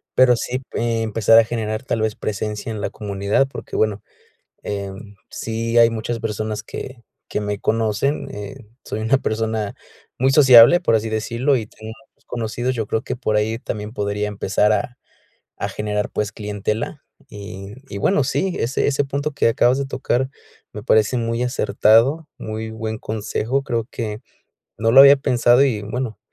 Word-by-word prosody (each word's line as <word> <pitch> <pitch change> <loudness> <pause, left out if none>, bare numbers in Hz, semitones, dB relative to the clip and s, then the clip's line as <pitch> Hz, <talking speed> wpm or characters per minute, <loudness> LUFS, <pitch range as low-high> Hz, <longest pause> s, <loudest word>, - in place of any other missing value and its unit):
pero 125 -2 +5
sí, 125 +2 -3
empezar 115 -1 +2
a 115 - +8
generar, 110 -1 -3
tal 120 -3 -2
vez, 110 -1 0
presencia 105 +1 -4
en 110 - -5
la - - -2
comunidad, 100 +4 0
porque, - - -8
bueno 105 -2 0 0.6
em, 100 0 -6
sí 115 +1 -3
hay 115 0 +7
muchas 115 +1 -3
personas 110 0 -3
que 120 +2 -8 0.3
que - - -2
me 105 0 -2
conocen, 115 +7 0
eh, 105 +2 -7 0.3
soy 110 - -5
una 110 +5 +2
persona 110 -3 -2 0.5
muy 130 +2 +3
sociable, 135 +2 +8
por 175 - +1
así 110 0 -1
decirlo, 115 +5 0
y 110 - -4
tengo 110 +1 -11 0.2
muchos - - -38
conocidos, 120 +2 -3
yo 110 -3 -2
creo 110 - -1
que - - -4
por 115 -4 -1
ahí 110 +2 0
también 105 -3 -5
podría 105 -1 -2
empezar 105 0 +1
a 120 +3 -2 0.6
a - - -2
generar, 105 -1 -2
pues, 105 -1 -2
clientela, 105 +6 -4 0.3
y 100 -1 -9 0.2
y, 100 - -6
bueno, 130 +7 +2
sí, 185 +7 -1
ese 120 +4 0
ese 145 0 +1
punto 140 +2 -2
que 140 -4 +1
acabas 120 +3 +3
de 140 - -1
tocar 130 -1 -1 0.4
me - - -7
parece 110 +3 +3
muy 115 0 -1
acertado, 125 +5 +3
muy 110 +1 -5
buen 110 0 -4
consejo, 110 +4 -2
creo 115 -3 -2
que 110 -2 -5 0.6
no 115 +1 +1
lo 135 - +8
había 140 +1 +8
pensado 125 0 +3
y, 120 -7 0
bueno, 115 +2 -4
110 Hz, 170 wpm, -21 LUFS, 105-125 Hz, 0.6 s, a